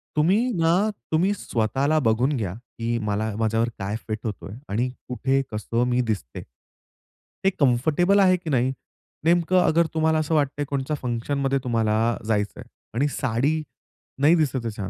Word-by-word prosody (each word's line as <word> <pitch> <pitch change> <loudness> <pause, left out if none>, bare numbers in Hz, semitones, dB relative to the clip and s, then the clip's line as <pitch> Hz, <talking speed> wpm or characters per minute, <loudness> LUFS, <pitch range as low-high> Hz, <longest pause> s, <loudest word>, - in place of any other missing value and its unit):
तुम्ही 165 +7 +3 0.2
ना, 175 +6 +3 0.2
तुम्ही 180 +6 +2
स्वतःला 140 - 0
बघून 125 +6 +2
घ्या, 100 -6 -3
की 115 +1 -4
मला 105 0 -2
माझ्यावर 115 +1 +1
काय 100 +2 -3
फिट 110 -1 -3
होत 110 - -1
आहे 100 +3 -8
आणि 120 +5 0 0.2
कुठे, 135 +2 0
कसं 115 +2 -1
मी 125 0 +2
दिसते. 110 - -3 1.0
ते 195 - +5
कम्फर्टेबल 155 +9 +3
आहे 185 -2 +5
की 165 -2 -7
नाही? 130 -1 +2 0.5
नेमकं 175 +2 +3
अगर 170 0 +3
तुम्हाला 160 0 +2
असं 155 +1 0
वाटतं 145 -3 +2
आहे - - 0
कोणाच्या 140 +2 -1
फंक्शनमध्ये 135 +3 -1
तुम्हाला 115 -1 +1
जायचं 105 -2 -1
आहे - - -11 0.3
आणि 140 +5 +2
साडी 140 +3 0 0.6
नाही 155 +4 +6
दिसत 150 -6 +1
आहे 115 - -1
छान. 100 -2 -4
130 Hz, 160 wpm, -24 LUFS, 115-155 Hz, 1.0 s, नाही